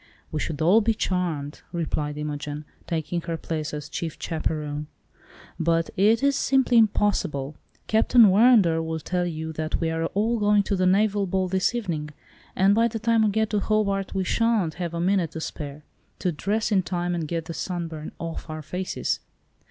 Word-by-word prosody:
"We 155 - -2
should 155 0 -2
all 195 +8 +6
be 225 +1 +1
charmed," 165 -8 -2
replied 150 -3 -2
Imogen, 150 0 -4 0.2
taking 170 +1 -2
her 165 0 -3
place 155 -1 -4
as 150 -1 -5
chief 165 -2 -5
chaperon, 150 -2 -3 0.7
"but 165 0 +1
it 220 +6 +3
is 280 0 +3
simply 260 -3 +3
impossible. 155 -10 +1 0.3
Captain 225 +1 +5
Warrender 195 -6 +5
will 160 0 -3
tell 180 +3 -1
you 160 -1 -4
that 155 0 -2
we 165 -1 0
are 165 0 -1
all 225 +3 +1
going 205 0 +4
to 200 - -1
the 185 -1 +2
naval 200 +1 +2
ball 185 +1 0
this 190 +5 +1
evening, 170 -10 -3 0.5
and 195 +2 +4
by 230 +2 +4
the 225 - -4
time 225 +1 +2
we 215 - +4
get 220 +1 0
to 210 - +2
Hobart 200 -2 0
we 190 - +1
sha'n't 220 -5 +1
have 170 -1 -3
a - - -2
minute 175 -2 +1
to 160 - -5
spare, 150 -2 -6 0.3
to 180 - 0
dress 210 +8 -1
in 195 -2 +4
time 175 0 -2
and 165 -3 -2
get 165 0 -3
the 165 - -6
sunburn 165 -4 -4
off 165 -1 -6
our 155 0 -5
faces." 180 +5 -2
175 Hz, 185 wpm, -25 LUFS, 160-205 Hz, 0.7 s, all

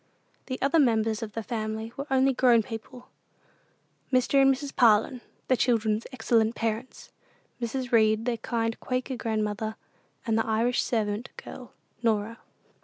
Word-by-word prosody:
The 255 - -4
other 285 +4 +3
members 225 -4 +2
of 215 -2 -6
the 225 - -4
family 220 0 -4
were 280 +1 -5
only 265 0 +3
grown 245 -3 +4
people: 235 +2 -9 1.0
Mr. 255 +2 +3
and 270 0 +6
Mrs. 275 +1 -4
Parlin, 235 +2 +4 0.3
the 255 - +4
children's 225 -3 +1
excellent 225 -2 +1
parents; 225 +3 -4 0.5
Mrs. 245 +2 -3
Read, 220 -1 +3
their 245 -2 0
kind 225 0 -2
Quaker 255 +1 -3
grandmother; 220 -1 -2 0.5
and 225 -2 +1
the 225 - -1
Irish 230 +3 +1
servant 215 0 -2
girl, 250 - -10 0.3
Norah. 225 0 0
230 Hz, 140 wpm, -27 LUFS, 220-255 Hz, 1.0 s, and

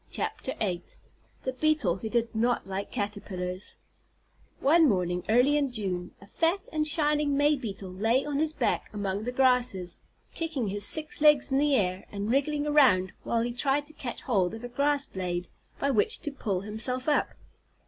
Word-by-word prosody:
THE 210 +3 -4
BEETLE 305 - +2
WHO 220 +3 -5
DID 235 0 0
NOT 235 +2 +1
LIKE 195 +1 -4
CATERPILLARS 200 -4 -4 0.8
One 315 +2 +5
morning 180 -3 0
early 250 +6 +4
in 285 -3 +1
June, 185 -6 -3
a 200 - -14
fat 335 - 0
and 305 -1 +1
shining 295 -2 +3
May 295 +1 +4
Beetle 200 -7 -6
lay 225 +8 +1
on 290 -1 -2
his 310 0 +1
back - - -1
among 205 0 -3
the 245 - -2
grasses, 250 -9 +1 0.3
kicking 310 -10 -2
his 205 +1 0
six 310 -1 -2
legs 300 -3 +5
in 270 - +3
the 290 -1 +3
air, 185 -4 -1
and 205 +2 -3
wriggling 290 +2 +1
around 255 -12 +4
while 230 -1 0
he 240 - -2
tried 275 +3 +1
to 310 - -12
catch 255 -5 -6
hold 200 -5 0
of 225 - -10
a 245 - -5
grass 280 +3 +1
blade 180 -4 -4 0.3
by 280 - +1
which 210 -5 +2
to 295 - -4
pull 205 -9 -2
himself 230 +6 -3
up. 295 - +1
245 Hz, 170 wpm, -28 LUFS, 200-290 Hz, 0.8 s, One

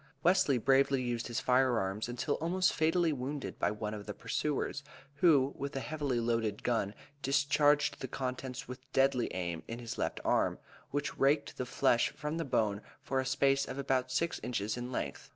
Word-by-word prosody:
Wesley 165 -6 +4
bravely 135 +3 +3
used 120 -1 -2
his 120 -2 -2
fire 125 -1 +3
arms 100 +3 -2
until 125 +4 -1
almost 180 +3 +1
fatally 165 0 +2
wounded 135 +1 -4
by - - +2
one 105 0 -4
of 105 -1 -7
the 105 - -5
pursuers, 145 -1 -2 0.4
who 140 -4 +4
with 140 +1 -5
a - - 0
heavily 145 -4 -2
loaded 115 -3 -1
gun 110 -4 0 0.3
discharged 145 +1 +3
the 130 - -4
contents 130 +1 -4
with 130 +1 -10
deadly 135 -2 +2
aim 85 -3 -3
in 115 - -5
his 120 -1 -6
left - - -1
arm, - - +2 0.3
which 145 +1 -2
raked 140 +2 +2
the 125 - -4
flesh 120 -3 +3
from 150 +2 -4
the 165 - -1
bone 105 -5 +1 0.2
for 135 - 0
a 130 - -1
space 135 +1 +2
of 130 - -6
about 130 -2 0
six 165 +5 0
inches 110 -3 -2
in 125 +1 -5
length. - - -4
130 Hz, 185 wpm, -32 LUFS, 120-145 Hz, 0.4 s, Wesley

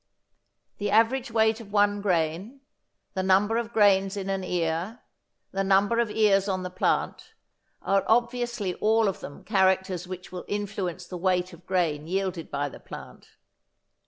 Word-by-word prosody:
The 205 0 -1
average 230 +5 +3
weight 220 0 +2
of 205 -3 -13
one 205 0 +2
grain, 185 - -1 0.5
the 190 - -1
number 195 +4 +3
of 235 -1 -3
grains 200 -2 +3
in 195 0 -3
an 195 -1 -2
ear, 175 +5 -2 0.5
the 195 0 -1
number 200 +4 +3
of 235 -2 +1
ears 210 -2 +3
on 185 -2 -1
the 180 - -5
plant, 445 - -1 0.5
are 195 0 +2
obviously 240 -4 0
all 220 +3 +2
of 195 - -2
them 145 - -10
characters 190 -3 +1
which 185 0 -8
will 180 -1 -6
influence 195 -4 -3
the 180 0 -7
weight 180 0 0
of 170 +1 -16
grain 160 -5 0
yielded 185 -2 -2
by 145 0 -2
the 140 - -10
plant. - - -11
195 Hz, 160 wpm, -26 LUFS, 180-215 Hz, 0.5 s, average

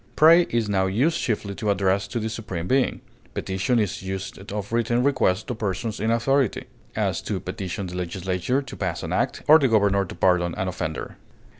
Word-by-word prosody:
Pray 165 +3 +7
is 115 -2 0
now 95 -2 +1
used 130 - +1
chiefly 105 -3 -2
of 110 - -2
address 100 0 +1
to 120 - -3
the 110 - -2
Supreme 110 -6 -5
Being; 130 +4 +1 0.3
petition 95 +6 0
is 105 -4 -1
used 95 +1 -6
of 105 +1 -4
written 120 +1 +1
request 125 -8 +2
to 125 - -3
persons 105 0 -3
in 110 +2 0
authority; 125 +1 +1 0.3
as, - - 0
to - - -3
petition 95 +1 -5
the 90 0 -7
legislature 90 +8 -1
to - - -9
pass 90 -4 -3
an - - -3
act, - - -1
or 155 +1 +9
the 140 - +3
governor 100 -3 +3
to - - -9
pardon 85 -1 +2
an 95 - -2
offender. 80 -4 -4
100 Hz, 190 wpm, -24 LUFS, 95-120 Hz, 0.3 s, or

